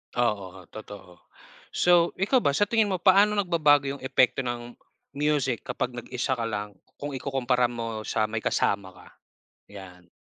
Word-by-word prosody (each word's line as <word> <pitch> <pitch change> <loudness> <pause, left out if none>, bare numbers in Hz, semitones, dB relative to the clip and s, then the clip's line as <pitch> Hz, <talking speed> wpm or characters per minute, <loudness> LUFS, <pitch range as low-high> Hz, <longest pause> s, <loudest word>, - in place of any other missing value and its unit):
Oo, 100 -6 -1
totoo. 95 -5 -11 0.6
So, 175 -1 +4
ikaw 205 +8 +2
ba 140 - +1
sa 205 - +3
tingin 220 0 +2
mo 190 - -1
paano 200 +2 +5
nagbabago 160 -7 +3
'yung 140 - -7
epekto 130 -1 +2
ng 120 -2 -4 0.4
music 140 -4 -1
kapag 125 +1 -2
nag-isa 125 +2 -4
ka 115 - -2
lang 105 -2 -5 0.2
kung 145 0 -6
ikukumpara 130 -2 0
mo 115 -2 -5
sa 110 - 0
may 115 0 -2
kasama 100 -2 0
ka? 90 - -16 0.6
'Yan. 90 -3 -12
125 Hz, 155 wpm, -26 LUFS, 110-150 Hz, 0.6 s, paano